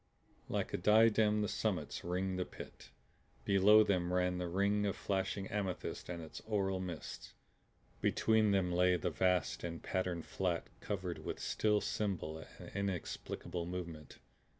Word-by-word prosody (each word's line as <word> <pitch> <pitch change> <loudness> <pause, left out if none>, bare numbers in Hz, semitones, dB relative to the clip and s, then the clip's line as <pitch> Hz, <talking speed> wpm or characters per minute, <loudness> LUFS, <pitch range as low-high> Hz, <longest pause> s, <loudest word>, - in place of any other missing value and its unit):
Like - - -1
a - - +1
diadem 105 +1 +5
the - - 0
summits - - -2
ringed 90 +1 -1
the - - +2
Pit. - - -11 0.6
Below 100 +2 +7
them 90 -4 +1
ran 90 0 +1
the 90 - -2
ring 100 +4 +1
of 100 - -1
flashing 95 0 -1
amethyst 100 -3 -3
with 85 -1 -5
its 80 - -8
aural 95 -3 0
mists. 90 -5 -6 0.7
Between 110 -1 +3
them 95 -3 +2
lay 90 +1 +4
the 85 - -1
vast 90 -10 +1
and 85 -1 -5
patterned 90 -3 -2
flat 90 -3 -1
covered 95 -4 -3
with - - -4
still 105 -1 +1
symbol 95 -7 -2
and - - -9
inexplicable 90 -2 -3
movement. 85 -4 -6
95 Hz, 145 wpm, -35 LUFS, 90-100 Hz, 0.7 s, Below